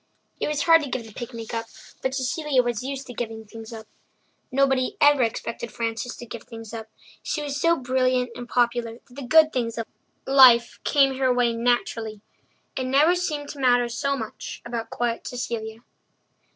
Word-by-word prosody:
It - - -1
was 300 -1 0
hard 330 -1 +6
to 285 - -5
give 250 -2 -3
the 220 - -13
picnic 235 -2 -7
up, 230 0 -3 0.3
but 260 0 -1
Cecilia 270 0 +1
was 240 -2 -2
used 270 +1 -5
to 245 - -9
giving 225 -2 -5
things 225 +1 -10
up. 220 -1 -8 0.7
Nobody 265 -1 +2
ever 290 -2 +6
expected 230 0 -2
Frances 230 +1 -3
to 240 - -9
give 235 -1 -8
things 225 -2 -10
up; 220 -1 -6 0.3
she 300 - -3
was 285 -1 -3
so 335 0 +4
brilliant 255 -1 +1
and 245 0 -8
popular 240 -1 +1
that 245 +1 -18
the 280 - -8
good 310 +4 +5
things 235 -2 -2
of 230 - -2 0.4
life 255 -3 +6
came 270 -2 +3
her 260 -1 +3
way 245 -1 +2
naturally. 230 -2 -1 0.6
It 260 - -2
never 290 +6 +5
seemed 305 -5 -2
to 290 - -8
matter 245 -2 +4
so 280 +3 -1
much 220 -4 -7
about 230 -1 -4
quiet 235 -1 -2
Cecilia. 225 -2 -5
245 Hz, 180 wpm, -24 LUFS, 230-270 Hz, 0.7 s, hard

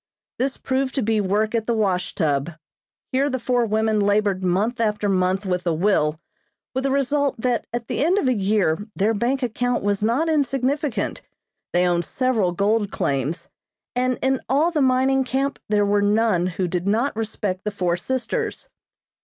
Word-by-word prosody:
This 265 +2 0
proved 265 0 -1
to 270 - 0
be 220 0 +1
work 210 +3 0
at 225 -1 -1
the 235 - +1
wash 190 -4 0
tub. 150 0 0 0.6
Here 275 +2 +2
the 260 - -1
four 245 -1 +1
women 220 0 +1
labored 205 -2 +1
month 200 +7 0
after 210 -2 0
month 190 +1 +1
with 180 -1 -1
a 165 - +2
will, 160 -4 +1 0.5
with 260 +1 -2
the - - +2
result 280 0 +1
that 245 0 0
at 240 -1 -4
the - - -1
end 355 +5 +3
of 285 - +1
a 255 - +3
year 200 -5 +1 0.2
their 210 +3 +2
bank 250 +5 0
account 245 0 -1
was 205 0 0
not 240 +9 +1
insignificant, 280 -2 0 0.5
they 180 +1 +3
owned 175 -1 +1
several 245 -8 0
gold 205 +3 +1
claims, 140 +1 -2 0.5
and 255 0 +1
in 265 0 +1
all 295 +6 +3
the 310 -3 0
mining 265 +1 +3
camp 270 +2 -1
there 205 -1 +3
were 205 0 +2
none 205 -3 +2
who 185 +1 -2
did 180 +2 -2
not 225 +7 +1
respect 205 -4 -3
the 210 - -1
four 180 -4 0
sisters. 260 - -3
220 Hz, 180 wpm, -22 LUFS, 195-260 Hz, 0.6 s, end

